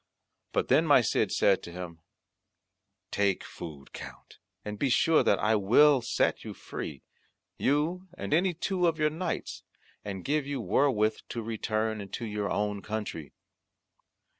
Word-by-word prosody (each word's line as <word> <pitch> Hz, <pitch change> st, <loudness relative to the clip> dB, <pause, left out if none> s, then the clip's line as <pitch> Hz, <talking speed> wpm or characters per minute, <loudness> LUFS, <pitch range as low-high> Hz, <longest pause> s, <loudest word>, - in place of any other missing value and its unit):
But -, -, 0 dB
then -, -, +4 dB
my -, -, +7 dB
Cid -, -, +1 dB
said 100 Hz, -1 st, +3 dB
to 85 Hz, -, -9 dB
him, 85 Hz, -2 st, -7 dB, 1.1 s
"Take 100 Hz, -2 st, +1 dB
food, 75 Hz, -5 st, -10 dB
Count, -, -, -11 dB, 0.3 s
and 105 Hz, -1 st, -5 dB
be 140 Hz, -, +1 dB
sure 160 Hz, +5 st, +4 dB
that 100 Hz, -, +3 dB
I 110 Hz, +2 st, +2 dB
will 125 Hz, +7 st, +5 dB
set -, -, 0 dB
you -, -, -7 dB
free, 70 Hz, -4 st, -7 dB, 0.6 s
you 160 Hz, +7 st, 0 dB
and -, -, -3 dB
any 175 Hz, +2 st, +2 dB
two 180 Hz, +1 st, 0 dB
of 165 Hz, -1 st, +1 dB
your 150 Hz, -1 st, +2 dB
knights, 170 Hz, +3 st, -4 dB, 0.4 s
and 95 Hz, -3 st, -6 dB
give 145 Hz, -1 st, 0 dB
you 140 Hz, -2 st, -2 dB
wherewith 110 Hz, 0 st, +2 dB
to 115 Hz, -, -4 dB
return 110 Hz, -1 st, -2 dB
into 100 Hz, +4 st, -6 dB
your 105 Hz, -1 st, -2 dB
own 105 Hz, -1 st, -1 dB
country." 105 Hz, -9 st, -5 dB
110 Hz, 150 wpm, -29 LUFS, 100-150 Hz, 1.1 s, my